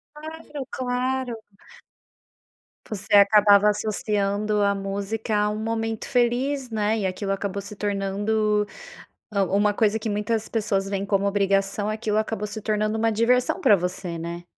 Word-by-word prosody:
Claro, 300 -2 -8
claro. 255 -1 -2 1.5
Você 205 -1 -3
acabava 205 0 +6
associando 210 0 -1
a 200 0 +3
música 200 +3 -3
à 210 0 +2
um 210 - -3
momento 225 0 -2
feliz, 255 +2 0
né? 215 0 0
E 195 - -1
aquilo 195 +1 -2
acabou 200 0 -3
se 205 +1 -9
tornando, 205 +1 0 0.7
hã, 200 -1 +2
uma 205 +1 +2
coisa 220 0 +1
que 220 - -3
muitas 210 +2 -1
pessoas 205 -3 -1
veem 195 0 -2
como 200 0 +1
obrigação 200 +1 +1
aquilo 215 -1 -1
acabou 215 -1 -1
se 210 +1 -7
tornando 215 +1 0
uma 225 0 +2
diversão 245 +3 +2
pra 205 - +5
você, 180 -1 -4
né? 170 +1 -6
210 Hz, 145 wpm, -24 LUFS, 200-225 Hz, 1.5 s, acabava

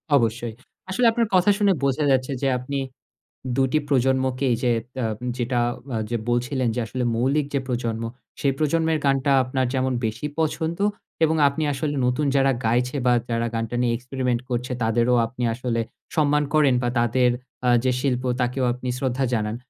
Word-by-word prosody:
অবশ্যই। 115 -2 0 0.4
আসলে 235 +6 +1
আপনার 230 -1 +1
কথা 185 +3 +5
শুনে 200 -3 +3
বোঝা 140 +2 +1
যাচ্ছে 130 +1 +1
যে, 135 - +1
আপনি 140 +3 -4 0.8
২ 135 - +3
টি 155 - +3
প্রজন্মকেই 130 -1 +1
যে 120 - +3 0.3
আ - - +1 0.3
যেটা 120 0 0 0.4
আ - - 0 0.3
বলছিলেন 125 +1 0
যে - - -1
আসলে, 125 +3 -3
মৌলিক 135 +5 +1
যে 140 - +2
প্রজন্ম, 115 -2 -2 0.4
সে 140 - 0
প্রজন্মের 160 +1 +1
গানটা 135 0 +2
আপনার 130 +1 -1
যেমন 130 0 0
বেশি 110 +6 -3
পছন্দ 160 +2 -1 0.4
এবং 160 0 +3
আপনি 140 +3 -1
আসলে 145 +2 -2
নতুন 125 +4 +1
যারা 135 0 +4
গাইছে 125 +4 +1
বা 125 - +5 0.2
যারা 115 0 0
গানটা 115 +1 -2
নিয়ে 120 -1 +2
experiment 125 -1 -2
করছে, 125 +1 -2
তাদেরও 120 +2 +2
আপনি 120 +2 -6
আসলে 120 -1 -2 0.4
সম্মান 150 -1 +3
করেন 145 -5 +4
বা 120 - +1
তাদের 125 +1 +3 0.4
আ - - +5
যে 130 - +2
শিল্প 130 -2 0 0.2
তাকেও 125 +1 0
আপনি 125 0 -5
শ্রদ্ধা 130 0 0
জানান। 110 -1 -1
130 Hz, 170 wpm, -23 LUFS, 120-140 Hz, 0.8 s, কথা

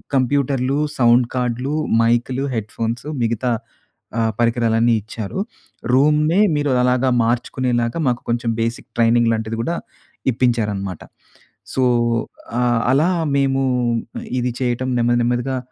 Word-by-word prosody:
కంప్యూటర్లు, 135 0 +1 0.2
సౌండ్ 120 0 +5
కార్డులు, 125 +3 -1 0.3
మైక్‌లు, 120 +3 +1
హెడ్‌ఫోన్స్ 115 +3 -3 0.2
మిగతా 115 +2 0 0.7
ఆ - - +2 0.2
పరికరాలన్నీ 115 0 +2
ఇచ్చారు. 110 - -6 0.5
రూమ్‌‌నే 150 +6 +3 0.2
మీరు 145 -1 0
అలాగా 125 +1 +2
మార్చుకునేలాగా, 120 +2 0
మాకు 120 -1 0
కొంచెం 120 0 0
బేసిక్ 115 +1 -3
ట్రైనింగ్ 115 0 +4
లాంటిది 110 0 -3
గూడా 170 +7 -1 0.6
ఇప్పించారన్నమాట. 105 -7 -1 0.7
సో 130 - +1 0.8
ఆహ్, 120 -2 +2
అలా 155 +7 +3 0.3
మేము, 135 -1 +1 0.8
ఇది 125 0 -1
చేయటం 125 0 -1
నెమ్మది 120 +1 +2
నెమ్మదిగా 125 +2 0
120 Hz, 105 wpm, -20 LUFS, 115-130 Hz, 0.8 s, సౌండ్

